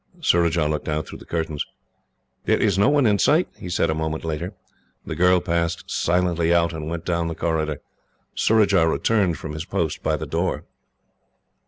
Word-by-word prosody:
Surajah 85 Hz, -, +2 dB
looked 75 Hz, 0 st, -2 dB
out 75 Hz, +1 st, -1 dB
through -, -, -10 dB
the -, -, -13 dB
curtains. 80 Hz, -3 st, -2 dB, 0.8 s
"There -, -, +3 dB
is 100 Hz, -4 st, +2 dB
no 100 Hz, +7 st, +4 dB
one 145 Hz, -2 st, +3 dB
in 105 Hz, -2 st, +3 dB
sight," 165 Hz, +4 st, +3 dB
he 90 Hz, -, -7 dB
said, 85 Hz, -2 st, +1 dB
a -, -, +1 dB
moment 80 Hz, 0 st, -3 dB
later. 85 Hz, +5 st, -4 dB, 0.5 s
The -, -, -4 dB
girl 90 Hz, +2 st, +4 dB
passed 85 Hz, -1 st, -1 dB
silently 85 Hz, -1 st, +1 dB
out, 85 Hz, -1 st, +3 dB
and 80 Hz, -1 st, -5 dB
went 85 Hz, 0 st, -5 dB
down 85 Hz, -1 st, 0 dB
the 80 Hz, -, -4 dB
corridor. 80 Hz, -3 st, -1 dB, 0.5 s
Surajah 100 Hz, -6 st, +3 dB
returned 90 Hz, +3 st, +1 dB
from 80 Hz, -, -7 dB
his 80 Hz, +1 st, -4 dB
post 80 Hz, -3 st, -2 dB
by -, -, 0 dB
the -, -, -5 dB
door. -, -, -2 dB
85 Hz, 180 wpm, -23 LUFS, 80-90 Hz, 0.8 s, no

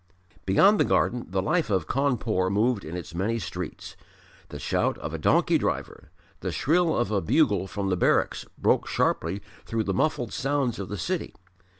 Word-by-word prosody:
Beyond 195 Hz, -, +5 dB
the -, -, +5 dB
garden 120 Hz, 0 st, +1 dB
the 95 Hz, 0 st, -1 dB
life 170 Hz, -, +1 dB
of 95 Hz, -5 st, +1 dB
Cawnpore 115 Hz, -, 0 dB
moved 105 Hz, +2 st, +1 dB
in 80 Hz, +3 st, -6 dB
its 85 Hz, -1 st, -8 dB
many 100 Hz, +7 st, -1 dB
streets; 90 Hz, -4 st, -6 dB, 0.5 s
the -, -, -7 dB
shout -, -, 0 dB
of -, -, -6 dB
a -, -, -3 dB
donkey -, -, +3 dB
driver, -, -, -3 dB, 0.3 s
the 95 Hz, -, -3 dB
shrill 165 Hz, -, +2 dB
of 120 Hz, -4 st, 0 dB
a 100 Hz, -2 st, +1 dB
bugle 105 Hz, -, +2 dB
from 100 Hz, 0 st, -3 dB
the 90 Hz, -, +2 dB
barracks 90 Hz, -, +1 dB
broke -, -, +2 dB
sharply 100 Hz, -, 0 dB, 0.2 s
through 115 Hz, -1 st, -2 dB
the 95 Hz, -, -1 dB
muffled 120 Hz, 0 st, 0 dB
sounds 135 Hz, -3 st, -1 dB
of 100 Hz, -, -5 dB
the 105 Hz, -, -4 dB
city. 85 Hz, -, -3 dB
105 Hz, 180 wpm, -26 LUFS, 95-125 Hz, 0.5 s, Beyond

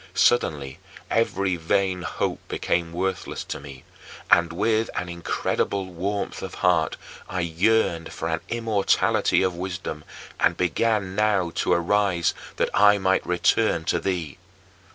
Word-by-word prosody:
Suddenly 75 Hz, -, +2 dB, 0.3 s
every 100 Hz, -5 st, +1 dB
vain 90 Hz, +2 st, 0 dB
hope 90 Hz, -, -2 dB
became 85 Hz, -1 st, -1 dB
worthless 95 Hz, +2 st, -3 dB
to -, -, -6 dB
me, 70 Hz, -2 st, -11 dB, 0.5 s
and 85 Hz, -1 st, +5 dB
with 110 Hz, +5 st, +1 dB
an 90 Hz, -, -3 dB
incredible 85 Hz, +3 st, -1 dB
warmth 100 Hz, +4 st, -3 dB
of -, -, -6 dB
heart -, -, +2 dB, 0.3 s
I 90 Hz, -, -2 dB
yearned 85 Hz, 0 st, +1 dB
for 80 Hz, -, -4 dB
an 80 Hz, 0 st, -1 dB
immortality 110 Hz, -5 st, +2 dB
of 95 Hz, -1 st, +1 dB
wisdom 90 Hz, -3 st, -5 dB, 0.4 s
and -, -, +2 dB
began 95 Hz, +2 st, 0 dB
now 100 Hz, -4 st, +1 dB
to -, -, +2 dB
arise 90 Hz, 0 st, +2 dB, 0.2 s
that -, -, 0 dB
I 105 Hz, 0 st, +6 dB
might 95 Hz, -1 st, +1 dB
return 90 Hz, +1 st, +2 dB
to -, -, +1 dB
thee. 90 Hz, -6 st, -3 dB
90 Hz, 130 wpm, -24 LUFS, 85-100 Hz, 0.5 s, I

